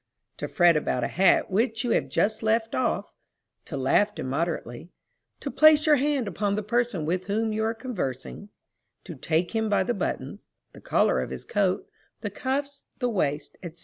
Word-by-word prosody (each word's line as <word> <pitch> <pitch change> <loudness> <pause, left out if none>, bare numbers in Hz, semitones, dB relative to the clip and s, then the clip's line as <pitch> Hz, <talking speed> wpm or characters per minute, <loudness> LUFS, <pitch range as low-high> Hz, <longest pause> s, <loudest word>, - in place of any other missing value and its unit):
to - - -5
fret 175 -2 +4
about 135 -4 0
a - - +1
hat 190 0 +3
which 225 +3 +1
you 240 - -1
have - - +1
just 215 +1 0
left 225 +1 +1
off; 250 -2 -1 0.5
to 145 - -5
laugh 135 +10 +2
immoderately; 140 0 -3 0.5
to - - -5
place 310 -1 +6
your 300 -2 +5
hand 275 -3 0
upon 200 +2 -1
the 210 - -2
person 235 -6 0
with 180 +4 -2
whom 220 +2 0
you 220 +1 -1
are 225 +1 0
conversing; 205 - -5 0.5
to 175 - -8
take 160 +4 -1
him 220 -1 0
by 205 - +3
the 240 - -1
buttons, - - -4 0.3
the - - -13
collar - - +2
of - - -4
his - - -7
coat, 205 - 0 0.3
the - - -4
cuffs, 280 +1 -3 0.2
the 250 -2 0
waist, 150 -7 -2
&c. 170 -2 -7
210 Hz, 180 wpm, -26 LUFS, 170-240 Hz, 0.5 s, place